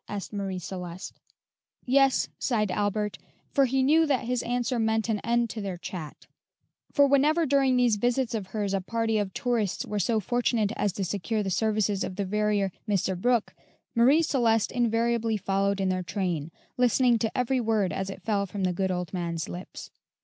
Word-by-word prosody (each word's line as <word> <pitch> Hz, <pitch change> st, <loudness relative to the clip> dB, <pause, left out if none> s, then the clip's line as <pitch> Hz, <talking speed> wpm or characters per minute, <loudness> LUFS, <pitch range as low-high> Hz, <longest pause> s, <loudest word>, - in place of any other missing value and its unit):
asked 205 Hz, +1 st, -6 dB
Marie 195 Hz, -2 st, -3 dB
Celeste. 180 Hz, 0 st, -7 dB, 0.7 s
"Yes," 270 Hz, +1 st, +3 dB
sighed 215 Hz, -6 st, 0 dB
Albert; 210 Hz, +1 st, -1 dB, 0.3 s
for 275 Hz, -2 st, +4 dB
he 265 Hz, +1 st, +1 dB
knew 315 Hz, +4 st, +4 dB
that 265 Hz, -4 st, 0 dB
his 250 Hz, 0 st, 0 dB
answer 245 Hz, +1 st, -1 dB
meant 220 Hz, 0 st, +1 dB
an 215 Hz, -2 st, +1 dB
end 235 Hz, +2 st, +1 dB
to 220 Hz, -, -5 dB
their 195 Hz, -3 st, -4 dB
chat; 170 Hz, -4 st, -8 dB, 0.7 s
for 285 Hz, -, +5 dB
whenever 295 Hz, +4 st, +3 dB
during 270 Hz, -2 st, +3 dB
these 240 Hz, -4 st, +3 dB
visits 245 Hz, +2 st, 0 dB
of 210 Hz, -4 st, -3 dB
hers 200 Hz, 0 st, -2 dB
a 195 Hz, -, 0 dB
party 225 Hz, +2 st, 0 dB
of 200 Hz, -2 st, -2 dB
tourists 225 Hz, -4 st, -1 dB
were 210 Hz, -, -3 dB
so 225 Hz, +2 st, +1 dB
fortunate 230 Hz, -1 st, 0 dB
as 205 Hz, -, 0 dB
to 195 Hz, -, -3 dB
secure 205 Hz, +3 st, -2 dB
the 190 Hz, -, -2 dB
services 210 Hz, -1 st, +1 dB
of 185 Hz, -, -5 dB
the 200 Hz, 0 st, -2 dB
verier, 210 Hz, 0 st, 0 dB, 0.2 s
Mr. 195 Hz, -2 st, +1 dB
Brooke, 235 Hz, +4 st, +1 dB, 0.4 s
Marie 265 Hz, +7 st, +5 dB
Celeste 230 Hz, -7 st, +2 dB
invariably 230 Hz, -2 st, +1 dB
followed 200 Hz, 0 st, 0 dB
in 190 Hz, -1 st, +1 dB
their 185 Hz, 0 st, 0 dB
train, 175 Hz, -5 st, -2 dB, 0.3 s
listening 245 Hz, -1 st, +3 dB
to 225 Hz, -1 st, -2 dB
every 255 Hz, +1 st, +1 dB
word 220 Hz, -5 st, +1 dB
as 190 Hz, 0 st, -3 dB
it 195 Hz, -, -8 dB
fell 200 Hz, -2 st, 0 dB
from 195 Hz, +1 st, -4 dB
the 180 Hz, -1 st, +1 dB
good 190 Hz, +2 st, -1 dB
old 180 Hz, -1 st, -3 dB
man's 170 Hz, -3 st, -3 dB
lips. 180 Hz, +1 st, -8 dB
215 Hz, 185 wpm, -27 LUFS, 195-245 Hz, 0.7 s, for